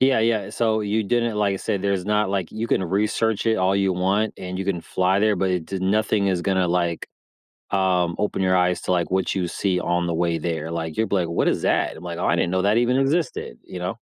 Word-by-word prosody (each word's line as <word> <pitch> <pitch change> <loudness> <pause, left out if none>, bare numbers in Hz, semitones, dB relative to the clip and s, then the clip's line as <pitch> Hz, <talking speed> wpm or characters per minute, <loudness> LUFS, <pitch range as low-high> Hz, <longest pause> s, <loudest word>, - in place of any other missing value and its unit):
Yeah, 130 -2 +4
yeah, 110 -3 +1
so 110 0 +1
you 105 +1 0
didn't 120 0 0
like 100 -2 +1
I - - -2
said, 95 0 -2
there's 100 -2 0
not 105 -1 +1
like, 95 -3 -2
you 110 +2 -3
can 95 - +1
research 105 +4 0
it 110 0 +3
all 95 0 +2
you 95 -1 +2
want 95 +4 0
and 90 0 -6
you 95 - -2
can 95 -3 -1
fly 95 +3 +1
there, 105 -2 +3
but 95 +1 0
it 90 -3 -1
d 95 - -4
nothing 100 +1 +1
is 90 -3 0
gonna, 95 -2 +1
like, 85 -1 -1 0.6
um, 90 -3 +1
open 105 -2 -1
your 95 0 +3
eyes 90 -1 +2
to, - - -1
like, 85 -2 0
what 95 +1 0
you 90 -2 -1
see 95 -1 -1
on 85 0 0
the 85 - -1
way 85 0 0
there, 80 -1 -3
like, 80 -2 -4
you'll 110 -2 0
be 100 - +1
like, 85 -3 0
"What 85 - +1
is - - 0
that?" - - +1
I'm 85 - -11
like, 85 -1 -5
"Oh, - - -1
I - - +2
didn't 85 - 0
know 95 0 +1
that 105 +2 +2
even 125 +2 +2
existed." 135 - -1
You 90 - -8
know? 95 +6 -4
95 Hz, 260 wpm, -23 LUFS, 90-105 Hz, 0.6 s, Yeah